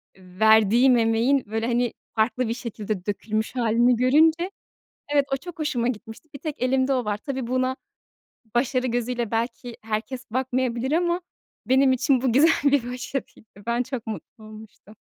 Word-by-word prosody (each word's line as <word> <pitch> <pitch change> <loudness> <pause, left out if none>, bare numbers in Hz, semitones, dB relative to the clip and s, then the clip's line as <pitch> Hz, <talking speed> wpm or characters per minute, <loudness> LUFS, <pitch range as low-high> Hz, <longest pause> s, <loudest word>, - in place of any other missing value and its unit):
eee, 185 0 -17
verdiğim 220 +4 +5
emeğin, 230 +4 +2
böyle, 220 +2 -2
hani, 240 0 0 0.2
farklı 225 +2 +1
bir 225 - -1
şekilde 215 -5 -5
dökülmüş 215 +3 -2
hâlini 240 +1 +3
görünce 315 - +3 0.6
evet, 285 -1 +4
o - - +3
çok 335 +5 -10
hoşuma 285 -6 0
gitmişti, 225 +4 -7
bir - - -7
tek 305 -2 -6
elimde 260 +1 +2
o 255 -2 0
var. 210 -1 -1
Tabii, 260 +3 -5
buna 255 +1 0 0.8
başarı 255 +1 +1
gözüyle 240 -1 -2
belki 235 +1 -3
herkes 225 +3 -4
bakmayabilir 255 0 -1
ama 345 +2 +1 0.4
benim 265 +1 +4
için 260 0 +2
bu 255 -3 +1
güzel 295 +6 +6 0.2
bir 245 -4 +1
başarıydı. 250 -3 -6 0.2
Ben 235 +1 +1
çok 250 -2 -6
mutlu 220 0 -8
olmuştum. 215 0 -13
245 Hz, 155 wpm, -24 LUFS, 225-265 Hz, 0.8 s, güzel